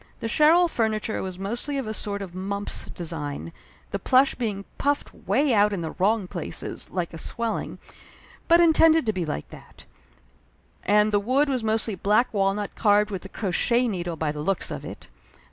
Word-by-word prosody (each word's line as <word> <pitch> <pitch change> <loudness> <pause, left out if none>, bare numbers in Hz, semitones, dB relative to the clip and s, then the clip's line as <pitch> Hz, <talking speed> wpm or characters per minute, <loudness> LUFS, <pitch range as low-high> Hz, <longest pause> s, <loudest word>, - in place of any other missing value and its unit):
The 230 - -3
Sherrill 320 +8 +5
fur 230 -9 0
niture 215 0 -3
was 185 -1 -5
mostly 235 +9 -2
of 270 - -2
a 215 - -4
sort 200 -1 -2
of 180 -3 -9
Mumps 200 +2 -2
design, 150 - -6 0.4
the - - -2
plush 265 +2 +4
being 210 -5 -3
puffed 285 0 -1
way 285 -3 +1
out 210 -1 +4
in 195 -4 -3
the 160 - -4
wrong 200 +1 +1
place 175 -3 -3 0.3
like 175 -2 -3
a 165 - -7
swelling, 230 +4 -2 0.7
but 335 +1 +6
intended 325 -2 +5
to 220 - 0
be 180 -4 -3
like 110 - -4
that; - - -14 1.0
and 210 +2 +3
the 205 - +3
wood 260 +8 +1
was 255 -4 -1
mostly 220 0 +1
black 210 +6 +1
walnut 200 0 0
carved 210 -1 +3
with 190 -1 -5
a - - -8
crochet 235 +6 +1
needle, 175 -5 -3
by 155 -2 -1
the 150 0 -6
looks 195 +4 -1
of - - -5
it. - - -9
210 Hz, 185 wpm, -25 LUFS, 185-240 Hz, 1.0 s, but